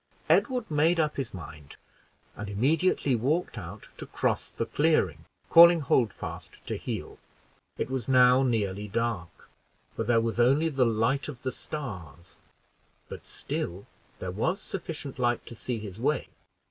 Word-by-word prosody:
Edward 250 - +2
made 160 +3 +3
up 150 -1 0
his 135 -4 -3
mind, 80 -5 -10 0.6
and 105 - -6
immediately 140 - +2
walked 145 +10 0
out - - -8
to - - -7
cross - - -1
the 115 - -3
clearing, 105 - +1 0.3
calling 170 0 +9
Holdfast 120 -6 -2
to - - -3
heel. - - -5 0.6
It - - -1
was 130 -3 -3
now 125 0 +6
nearly 105 -5 0
dark, 105 -6 -3 0.5
for 115 - -1
there 115 +1 +3
was 115 +1 -2
only 140 +7 +4
the 135 -4 +2
light 115 +5 +1
of 135 -5 -8
the 130 - -1
stars, 90 - -8 0.7
but - - -9
still 90 +4 -4 0.3
there 90 - -5
was 160 - -1
sufficient 150 -8 -6
light 120 -1 +1
to - - -9
see 120 +1 -3
his 105 -2 -8
way. 150 +5 0
125 Hz, 145 wpm, -28 LUFS, 105-150 Hz, 0.7 s, calling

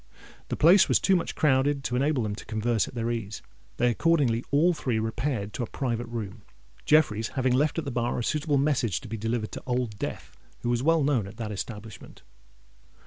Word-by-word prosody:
The - - -2
place 175 +6 +6
was - - +4
too 195 - +3
much 170 - -2
crowded 140 -1 +2
to 125 - -2
enable 140 -1 +1
them 105 -1 -2
to 105 - -9
converse 110 0 0
at - - -11
their 115 0 -1
ease: 110 -4 -5 0.3
they 120 0 +3
accordingly 130 -4 +2
all 160 +6 +3
three 130 -7 -2
repaired 110 -1 -2
to 125 - -3
a - - -4
private 120 -3 -2
room, 110 -5 -6 0.4
Jeffreys 115 -8 +3
having 130 -2 0
left 145 +5 +1
at 165 - -2
the 140 - -3
bar 120 0 -1
a 120 - -2
suitable 150 +2 0
message 135 -7 +1
to - - -10
be 115 - -4
delivered 115 0 -2
to - - -7
Old 125 -4 -2
Death - - -6 0.3
who 120 - -2
was 120 0 +1
well 160 +2 +3
known 130 -8 +1
at 100 +2 -12
that 110 -3 -4
establishment. 105 0 -8
120 Hz, 205 wpm, -27 LUFS, 110-145 Hz, 0.4 s, place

